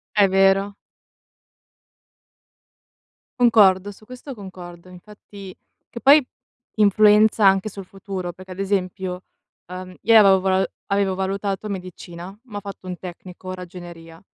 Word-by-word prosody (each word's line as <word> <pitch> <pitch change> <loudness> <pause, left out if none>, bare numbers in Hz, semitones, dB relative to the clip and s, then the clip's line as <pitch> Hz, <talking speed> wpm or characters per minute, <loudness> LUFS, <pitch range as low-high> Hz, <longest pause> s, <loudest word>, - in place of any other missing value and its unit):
È 205 -1 +5
vero. 195 +1 +2 2.7
Concordo, 205 -4 +4
su 215 - -19
questo 255 +3 -10
concordo, 185 -3 -11
infatti 195 +1 -13 0.3
che 235 - -8
poi 285 +4 +7 0.6
influenza 210 0 +4
anche 195 +2 +3
sul 195 -1 -9
futuro, 190 -2 -7
perché 185 +2 -15
ad 185 - -9
esempio, 190 -2 -3 0.5
uhm, 185 0 -8
io 225 -1 +5
avevo 195 -2 +6
vola 190 0 +1 0.2
avevo 200 -1 0
valutato 195 +2 -3
medicina, 185 -1 -8
ma 210 -3 -10
ho - - -4
fatto 195 -2 -10
un 180 - -5
tecnico, 185 +1 -9
ragioneria. 175 -2 -11
195 Hz, 120 wpm, -21 LUFS, 185-205 Hz, 2.7 s, poi